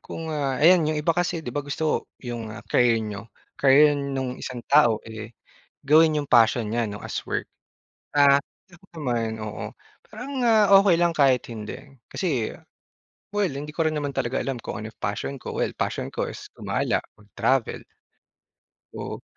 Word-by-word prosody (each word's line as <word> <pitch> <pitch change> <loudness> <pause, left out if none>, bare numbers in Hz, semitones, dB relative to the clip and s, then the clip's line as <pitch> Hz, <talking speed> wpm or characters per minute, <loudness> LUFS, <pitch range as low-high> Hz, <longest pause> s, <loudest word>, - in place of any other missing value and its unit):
Kung, 160 -1 -6
ah 140 -3 -1
ayan, 165 +1 +5
'yong 155 - -1
iba 150 +2 +1
kasi 175 -2 -1
'di - - -5
ba 145 - -1
gusto 145 +2 -2 0.2
'yung, 120 -2 -5
ah, 110 +2 -9
career 120 -2 +3
niyo, 105 +2 -7 0.3
career 145 +2 +6
nung 135 -3 -3
isang 120 -2 -6
tao 120 -7 +5
eh, 110 0 -9 0.5
gawin 155 +2 +5
niyong 145 -2 -3
passion 115 0 +5
niya, 115 -1 0
'no, 105 - -6
as - - -3
work. - - -1 0.7
Ah, 140 0 +6 0.3
oo 175 +2 -18
naman, 115 -6 -2
oo, 110 0 -5 0.4
parang, 250 +6 -7
ah, 215 -4 +5
okey 195 -4 +4
lang 170 0 +2
kahit 135 -4 +4
hindi. 110 -2 -6 0.3
Kasi 135 - -1 0.8
well, 205 -2 +1
hindi 145 +2 -6
ko 165 +2 -1
rin 155 - -3
naman 145 -2 -2
talaga 120 +3 -1
alam 135 -2 -2
kung - - -6
anong 110 0 -9
passion 105 +7 -3
ko. - - -6
Well, - - -1
passion - - -2
ko - - -2
is - - -9
gumala, - - -1 0.2
mag-travel. 110 +4 -1 1.1
Oo. - - -6
140 Hz, 165 wpm, -24 LUFS, 115-155 Hz, 1.1 s, career